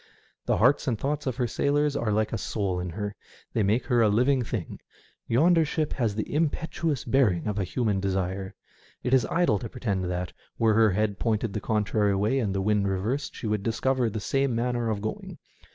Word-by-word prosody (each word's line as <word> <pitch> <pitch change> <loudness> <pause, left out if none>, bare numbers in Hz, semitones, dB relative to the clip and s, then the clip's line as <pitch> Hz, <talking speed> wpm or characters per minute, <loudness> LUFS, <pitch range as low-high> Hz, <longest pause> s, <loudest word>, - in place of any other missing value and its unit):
The - - +2
hearts 135 +6 +3
and 120 -4 +1
thoughts 145 +4 -2
of 130 - -1
her 125 -1 0
sailors 145 +4 +1
are 115 -6 0
like 110 +1 0
a - - 0
soul 95 -3 -2
in 90 0 -4
her. 105 +4 -4 0.4
They 115 - +1
make 105 +5 +1
her 120 -1 +2
a 110 - +5
living 125 +5 +3
thing. 110 -6 -5 0.5
Yonder 165 +8 +4
ship 155 0 -1
has 115 -6 -1
the 110 - -3
impetuous 160 -1 -1
bearing 115 - +2
of 105 -1 -2
a - - +1
human 105 +1 0
desire. 95 0 -2 0.5
It 125 - 0
is 130 -4 +4
idle 165 - +2
to 115 - -6
pretend 100 -7 -2
that, 90 -1 -3 0.2
were 115 -1 +3
her 110 0 +5
head 105 0 0
pointed 110 -2 0
the 105 - -3
con 105 -1 0
trary 100 -1 +1
way 110 +7 +1
and 100 -6 -1
the 95 - 0
wind 105 -1 +2
reversed, 105 +9 -2
she - - -7
would 105 -1 0
discover 120 +3 0
the 110 +1 -4
same 135 +4 0
manner 120 0 0
of 105 -2 -2
going. 110 - -5
110 Hz, 210 wpm, -27 LUFS, 100-130 Hz, 0.5 s, a